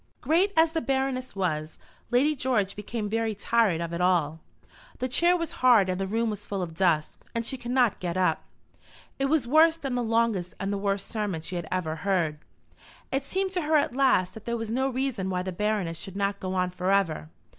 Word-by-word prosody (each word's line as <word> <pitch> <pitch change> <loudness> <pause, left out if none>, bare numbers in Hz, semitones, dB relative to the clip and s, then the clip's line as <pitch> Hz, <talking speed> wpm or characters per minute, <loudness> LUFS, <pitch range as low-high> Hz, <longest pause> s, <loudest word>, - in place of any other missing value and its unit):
Great 360 +6 +2
as 320 0 +5
the 325 0 -1
Baroness 265 -3 -1
was, 155 -5 -2 0.3
Lady 280 +5 +3
George 245 -7 0
became 210 +1 -4
very 225 0 -1
tired 210 -4 +2
of 170 0 -4
it 170 - -2
all. 165 -4 +2 0.6
The 255 - -2
chair 345 +8 +3
was 335 -2 -3
hard 235 -7 +6
and 185 +1 -1
the 195 - -1
room 225 +2 0
was 210 0 -7
full 195 -2 -2
of 165 -2 -6
dust, 160 -3 +1 0.2
and 230 0 -1
she 265 - -2
could 245 -2 -8
not 245 -4 +2
get 175 0 -3
up. 185 -1 +2 0.8
It 270 - +1
was 285 -2 +2
worse 320 +4 +5
than 275 -5 -4
the 245 - 0
longest 225 -6 0
and 195 0 -2
the - - -1
worst 200 0 -1
sermon 205 -7 -3
she 175 +3 -5
had 170 -2 -4
ever 165 -4 -2
heard. 170 -4 0 0.7
It 270 +1 -1
seemed 380 +4 -1
to 365 -1 -1
her 310 0 +1
at 285 - 0
last 260 -9 +3
that 220 - -11
there 235 0 -1
was 225 -1 -4
no 265 +3 +1
reason 255 -7 -2
why 180 -1 -1
the 185 - -3
Baroness 190 -4 -1
should 195 +2 -8
not 200 0 -1
go 185 0 -3
on 180 -1 0
for 180 +1 -1
ever. 165 -6 +1
210 Hz, 220 wpm, -27 LUFS, 185-255 Hz, 0.8 s, hard